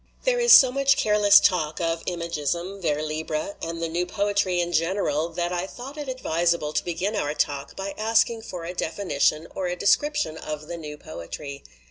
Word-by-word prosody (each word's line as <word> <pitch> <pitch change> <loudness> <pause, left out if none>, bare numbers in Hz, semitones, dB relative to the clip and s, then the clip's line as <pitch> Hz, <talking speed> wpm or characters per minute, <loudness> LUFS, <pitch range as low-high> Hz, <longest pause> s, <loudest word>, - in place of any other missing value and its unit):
There - - +2
is 475 0 +4
so 260 -2 +9
much 275 +1 +3
careless 210 -4 +6
talk 155 -4 +1
of 165 -1 -1
imagisme, 170 +2 -3
vers 155 -2 -1
libre, 155 +4 -3
and 165 0 -4
the 165 - -1
new 175 +2 -2
poetry 200 -2 0
in 175 0 -1
general 165 -2 0
that 175 +1 -3
I 180 +1 -2
thought 255 +7 -9
it 295 -3 -6
advisable 170 -10 0
to - - 0
begin 180 +5 -2
our 150 -7 -1
talk 140 -2 -2
by 195 0 -5
asking 225 +1 +2
for 180 -6 -7
a 175 - -5
definition 160 -3 0
or 185 - -2
a 175 - -2
description 295 - +1
of 155 0 -6
the 170 +2 -6
new 150 -2 -8
poetry. 140 - -8
175 Hz, 185 wpm, -25 LUFS, 155-205 Hz, -, so